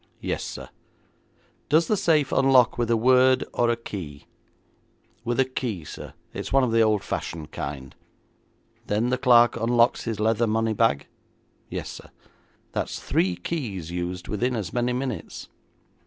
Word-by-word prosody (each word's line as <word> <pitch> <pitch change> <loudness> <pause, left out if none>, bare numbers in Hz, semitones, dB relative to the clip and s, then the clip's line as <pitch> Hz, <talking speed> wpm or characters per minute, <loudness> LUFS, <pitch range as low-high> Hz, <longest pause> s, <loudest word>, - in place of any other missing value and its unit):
'Yes, - - -3
sir.' - - -7 1.0
'Does 160 +3 +4
the 215 - +1
safe 155 -7 +2
unlock 130 -3 +4
with 120 -1 -1
a 115 - +3
word 130 +2 +4
or 120 - +2
a 120 - +2
key?' 90 -11 -8 1.0
'With 120 +2 -1
a 135 - +5
key, 120 - -4
sir. - - -9 0.2
It's - - -5
one 135 0 +4
of 125 - +1
the 115 0 +4
old 110 -2 +2
fashioned 80 -2 -5
kind.' 70 -2 -6 0.9
'Then 110 +4 +1
the 130 - 0
clerk 120 -3 +5
unlocks 115 +1 +2
his 115 -3 -3
leather 110 +2 +2
money 110 +1 +1
bag?' 110 -10 +2 0.6
'Yes, - - -5
sir.' - - -11 0.6
'That's - - -3
three 90 -1 0
keys 95 - -4
used 90 0 -4
within 120 +4 -1
as 100 -7 -4
many 120 0 0
minutes. 125 -2 -4
115 Hz, 155 wpm, -25 LUFS, 100-125 Hz, 1.0 s, a